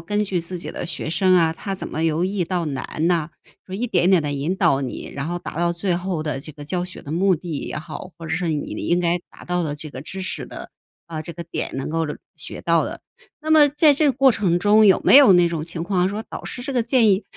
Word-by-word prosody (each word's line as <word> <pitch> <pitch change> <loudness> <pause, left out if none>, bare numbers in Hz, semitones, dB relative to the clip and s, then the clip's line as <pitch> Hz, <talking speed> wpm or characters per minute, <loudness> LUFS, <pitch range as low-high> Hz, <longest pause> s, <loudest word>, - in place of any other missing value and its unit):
根 205 +5 -1
据 185 -3 -1
自 175 +2 -5
己 - - -6
的 - - -5
学 160 -2 -4
生 185 +3 +3
啊， 165 -2 +3
他 195 +4 -5
怎 - - -5
么 160 - -4
由 165 +2 +1
易 190 0 -1
到 175 0 -1
难 150 +2 -3
呐， 170 -3 +1 0.4
说 185 - -7
一 235 +5 -2
点 180 -5 +2
点 185 -4 +4
地 145 -1 -2
引 145 +7 -2
导 165 -8 +3
你， 130 - -5
然 140 +3 -3
后 175 - -2
达 165 - -7
到 170 0 +2
最 175 +1 -1
后 175 -2 -2
的 150 -3 -3
这 155 - -8
个 145 0 -10
教 175 +4 -2
学 180 +1 -8
的 145 - -7
目 185 +2 +3
的 175 +2 -8
也 - - -5
好， 155 +4 -7
或 165 - -9
者 160 - -1
是 175 0 -1
你 150 -2 -2
应 175 - +2
该 175 0 +1
达 - - -14
到 180 0 -1
的 145 -2 -2
这 150 0 -5
个 130 - -8
知 190 +6 -6
识 185 - -3
的 - - -9 0.4
呃， 160 -2 -5
这 160 +2 -8
个 170 - -7
点 170 - -4
能 135 +3 -3
够 165 0 0 0.3
学 - - -4
到 - - +2
的。 - - -7 0.4
那 310 - -3
么 300 -2 +7
在 295 +1 +4
这 295 +2 +2
个 275 - +4
过 265 +1 +4
程 185 -6 +1
中， 210 +3 +5
有 190 - +5
没 - - +6
有 245 -10 +8
那 175 -1 +5
种 165 -2 -2
情 165 0 -5
况 180 +1 +1
说， 210 +3 -4
导 - - -6
师 245 - -6
这 275 - -3
个 245 -2 +1
建 230 -2 +4
议 195 +2 +2
175 Hz, 295 characters per minute, -22 LUFS, 160-195 Hz, 0.4 s, 有